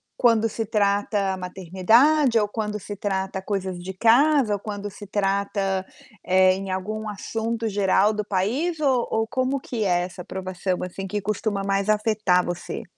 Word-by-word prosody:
quan 240 -3 +4
quando 225 +1 0
se 225 +1 -3
trata 200 -2 +1
maternidade 220 - +3
ou 210 - +1
quando 210 0 -3
se 205 +2 -7
trata 190 -1 -2
coisas 190 -2 -3
de 190 +2 -6
casa 240 +3 +4
ou - - -5
quando 205 -1 -5
se 205 +1 -11
trata, 195 -1 -1 0.4
eh, 185 0 +5
em 195 0 -5
algum 215 +4 -3
assunto 225 +2 -3
geral 200 +1 +3
do 210 0 -3
país, 245 - -1
ou 265 -5 +2
ou 225 0 0
como 260 +3 -1
que 235 -4 -4
é 175 -1 +2
essa 180 0 -6
aprovação 185 0 -3
assim 185 +2 -5
que 205 +1 -3
costuma 210 0 -2
mais 195 0 0
afetar 210 -4 +2
você? 175 0 -6
205 Hz, 165 wpm, -24 LUFS, 190-220 Hz, 0.4 s, eh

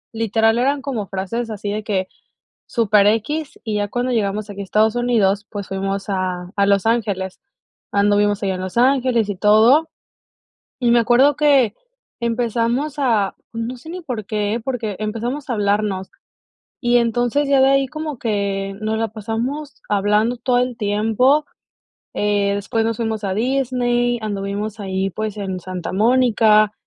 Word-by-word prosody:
literal 225 +1 +2
eran 275 +2 +1
como 225 -8 -3
frases 225 +5 -3
así 205 -1 -4
de 210 0 -3
que 190 -3 -1 0.6
súper 210 -3 +3
equis. 270 +8 -1
Y 215 -3 -2
ya 205 0 -1
cuando 245 +4 -2
llegamos 210 -2 -1
aquí 200 - -7
a - - -3
Estados 215 +4 +2
Unidos, 210 -5 +1
pues, 200 -2 -6
fuimos 195 0 -3
a 185 -2 -2
a 200 -1 +3
Los 200 +1 +2
Ángeles, 200 -5 -1 0.5
anduvimos 205 0 +2
allá 190 -1 0
en 185 - -5
Los 185 +4 -5
Ángeles 250 -3 +3
y 200 - -2
todo. 220 - +5 0.9
Y 240 -1 +2
me 235 - +5
acuerdo 250 +5 +4
que 275 -7 +3 0.4
empezamos 235 +4 -1
a, 225 -8 +1 0.2
no 230 +2 -4
sé, 320 +7 -11
ni 365 - -6
por 250 - -5
qué, 210 +2 -1
porque 230 -7 -3
empezamos 235 +6 -3
a - - +1
hablarnos, 205 -2 0 0.7
y, 240 0 +2
entonces, 240 +4 +1
ya 275 -1 +4
de 265 - +6
ahí 275 -1 +3
como 310 -2 -5
que 200 -3 -2
nos 220 +1 -1
la 225 -1 -1
pasamos 235 +7 -4
hablando 210 +4 +2
todo 245 +1 +1
el 250 -2 -1
tiempo, 225 +8 +2 0.7
eh, 205 -1 +1
después 225 +3 -1
nos 225 -1 -1
fuimos 220 -2 -2
a 190 - -1
Disney, 245 0 0
anduvimos 205 +1 -4
ahí, 190 0 -2
pues, 215 +2 -4
en 190 -2 -4
Santa 185 0 -5
Mónica, 215 -1 +4
220 Hz, 160 wpm, -20 LUFS, 200-245 Hz, 0.9 s, de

